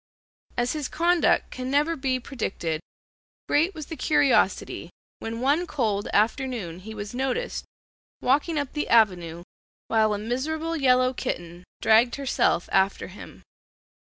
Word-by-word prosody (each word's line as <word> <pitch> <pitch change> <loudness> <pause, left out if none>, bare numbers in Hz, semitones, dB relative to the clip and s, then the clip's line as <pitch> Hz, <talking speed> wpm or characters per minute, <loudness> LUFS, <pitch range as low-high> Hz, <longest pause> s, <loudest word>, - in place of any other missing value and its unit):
As 240 +1 +1
his 300 -4 -3
conduct 345 +1 +2
can 255 0 -5
never 295 +4 +2
be 265 -3 -1
predicted, 195 - -3 0.7
great 325 +6 +2
was 310 -2 -6
the 320 - -7
curiosity 295 -3 +2 0.3
when 225 +1 -5
one 295 +7 +2
cold 215 -9 -1
afternoon 220 - 0
he 220 +4 -9
was 205 +1 -6
noticed 265 - -2 0.5
walking 295 +5 +1
up 285 -2 -2
the 300 - -2
avenue 175 -7 +3 0.5
while 215 -2 +3
a - - -3
miserable 305 +9 -2
yellow 255 -3 +3
kitten 175 -6 -5 0.2
dragged 225 +2 +5
herself 270 -9 +1
after 195 0 +1
him. 190 - -12
255 Hz, 135 wpm, -25 LUFS, 210-290 Hz, 0.7 s, dragged